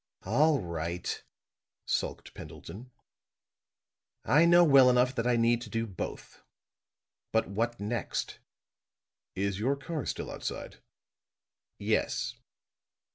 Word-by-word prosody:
"All 145 +8 +3
right," 85 0 -4 0.6
sulked - - -2
Pendleton. 110 +10 -10 1.4
"I 155 +4 +5
know 175 +1 +7
well 135 -5 +7
enough 125 +1 +3
that 120 -2 -1
I 125 - +3
need 115 0 +3
to 120 - -8
do 115 +2 -1
both. 95 -5 -7 0.9
But 110 - +2
what 115 +5 -2
next?" 105 +2 -3 1.0
"Is 100 0 -1
your 130 +6 +1
car 145 0 -5
still - - -4
outside?" - - -6 1.0
"Yes." - - 0
120 Hz, 105 wpm, -30 LUFS, 100-135 Hz, 1.4 s, know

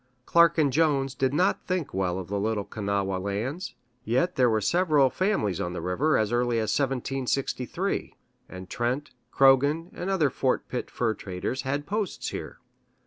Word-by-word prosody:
Clark 170 0 +5
and 145 -4 +2
Jones 140 -3 +2
did 130 0 0
not 180 +7 +1
think 180 -5 -2
well 90 -1 0
of 95 0 -7
Little 105 +1 0
Kanawha 100 -2 -2
lands, 110 - -3 0.3
yet 130 +10 +1
there 125 -2 +4
were 110 -1 +2
several 150 - +3
families 185 - 0
on 90 - -3
the - - -4
river 135 +13 +1
as 110 0 0
early 120 0 +1
as 110 -2 0
1763, 135 -1 -2 0.3
and 95 0 -9
Trent, 125 +8 -2 0.2
Croghan, 140 +5 +4
and 180 - -4
other 165 -8 +2
Fort 130 0 0
Pitt 125 - -4
fur 115 -3 0
traders 95 +6 -4
had 145 +2 -2
posts 205 +2 -2
here. - - -7
130 Hz, 160 wpm, -27 LUFS, 105-150 Hz, 0.3 s, Clark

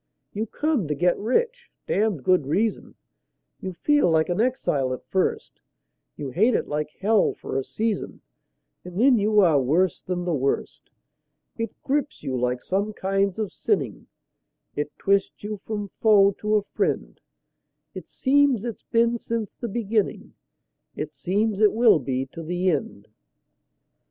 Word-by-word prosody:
You 215 +2 -2
come 295 - -1
to 150 - -1
get 175 +4 +2
rich 475 - -1 0.2
(damned 205 -9 0
good 180 -5 +3
reason); 210 +9 -1 0.6
You 185 - -5
feel 290 - +2
like 160 0 +2
an 175 +4 +1
exile 145 - 0
at 130 - -8
first; 190 -1 -2 0.6
You 140 -3 -5
hate 215 - +3
it - - -1
like 150 0 -2
hell 210 +1 +3
for - - -7
a 135 - 0
season, 220 +8 -3 0.6
And 180 +1 -7
then 250 -1 +5
you 210 +1 +4
are 160 -7 +4
worse 165 +8 +1
than 180 -1 -3
the 175 - 0
worst. 140 -1 -2 0.7
It 230 0 -5
grips 290 +1 -1
you 130 - -2
like 125 0 -1
some 200 +3 -1
kinds 195 -1 0
of 215 -4 -3
sinning; - - -2 0.7
It 145 0 -2
twists 200 0 0
you 210 +1 -3
from 205 0 -5
foe 205 -3 +6
to 210 0 +1
a 210 - +2
friend; - - -2 0.7
It - - -8
seems 270 -4 +2
it's 235 -3 -5
been 235 +1 +2
since 230 -3 -3
the 240 - -5
beginning; 215 -1 -1 0.6
It 155 0 -5
seems 200 +9 -1
it 215 -1 +5
will 225 -7 +5
be 130 0 -2
to 165 - -7
the 180 +3 0
end. 105 -9 -4
200 Hz, 155 wpm, -24 LUFS, 160-225 Hz, 0.7 s, foe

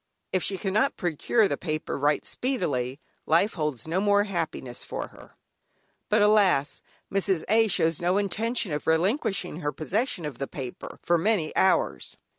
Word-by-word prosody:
If 185 - +2
she 195 - 0
cannot 215 +8 0
procure 180 +6 +1
the - - -2
paper 155 -3 -3
right 145 +1 +1
speedily, 145 - -2 0.3
life 210 - +3
holds 150 - -3
no 175 +4 0
more 205 0 +4
happiness 160 - -3
for - - -5
her. - - -16 0.7
But 210 0 +4
alas, 195 -9 +3 0.3
Mrs. 195 -3 +1
A. 225 +2 +4
shows 165 -5 +2
no 180 +2 +2
intention 220 0 0
of 150 - -3
relinquishing 180 - +1
her 145 -4 -2
possession 180 - -2
of 140 -5 -6
the 135 - -2
paper 130 -4 -7
for 175 -1 +2
many 185 -4 0
hours. 190 - +1
180 Hz, 155 wpm, -26 LUFS, 155-205 Hz, 0.7 s, more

